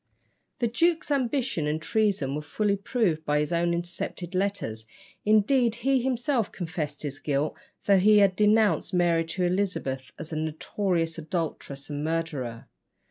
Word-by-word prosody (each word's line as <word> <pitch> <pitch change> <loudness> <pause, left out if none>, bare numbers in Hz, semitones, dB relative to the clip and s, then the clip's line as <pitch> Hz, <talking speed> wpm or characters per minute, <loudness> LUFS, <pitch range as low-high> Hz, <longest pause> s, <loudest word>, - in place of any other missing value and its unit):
The 240 - +1
duke's 330 +6 +1
ambition 255 - 0
and 150 +1 0
treason 195 - 0
were 150 - -2
fully 200 +7 0
proved 200 -6 0
by 150 -1 +1
his 150 +3 -1
own 170 0 +2
intercepted 175 +1 -4
letters; 185 - -2 0.4
indeed, 220 +3 +4
he 270 -2 +3
himself 245 -2 0
confessed 160 -4 -4
his 145 -1 -4
guilt, 145 +1 -1 0.3
though 200 -2 +5
he 210 +3 +6
had 200 -2 +5
denounced 210 -1 +3
Mary 170 -2 +3
to 170 +3 -3
Elizabeth 175 -9 -1
as 160 0 -7
a - - -2
"notorious 165 +2 -1
adulteress 155 -4 -4
and 145 0 -3
murderer." 155 -8 -3
175 Hz, 145 wpm, -27 LUFS, 155-210 Hz, 0.4 s, he